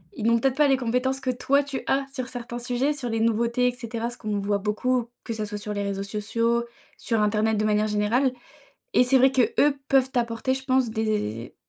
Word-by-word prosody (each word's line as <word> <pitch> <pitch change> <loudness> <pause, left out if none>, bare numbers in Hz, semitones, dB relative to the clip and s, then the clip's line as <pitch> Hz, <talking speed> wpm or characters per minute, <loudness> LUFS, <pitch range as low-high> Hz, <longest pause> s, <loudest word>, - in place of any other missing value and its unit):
ils 215 - -4
n'ont 230 0 +4
peut-être 265 +2 +1
pas 295 0 +4
les 270 - +4
compétences 255 +2 0
que 265 - -3
toi, 265 +3 +2
tu 280 -2 -5
as 275 0 +1
sur 255 -2 -4
certains 240 -1 -6
sujets, 250 +4 0
sur 255 -4 -5
les 225 0 -1
nouveautés, 235 +2 +2
et - - +2
cetera, 235 -1 -4
ce 240 - -10
qu'on 210 -2 -2
voit 200 0 0
beaucoup, 235 +4 0 0.2
que 230 - -3
ça 215 -1 -3
soit 210 0 -5
sur 210 +1 -5
les 205 0 -2
réseaux 200 0 -3
sociaux, 230 +3 0 0.3
sur 225 -2 -1
internet 215 +1 +1
de 215 - +1
manière 215 0 +2
générale 215 +6 +1 0.6
et - - +6
c'est 255 +2 +4
vrai 265 +1 +5
qu'eux 275 +3 +2
peuvent 265 -1 +3
t'apporter, 240 +1 0
je 265 - -6
pense 260 -2 +2
des 210 - -2
235 Hz, 220 wpm, -25 LUFS, 215-260 Hz, 0.6 s, et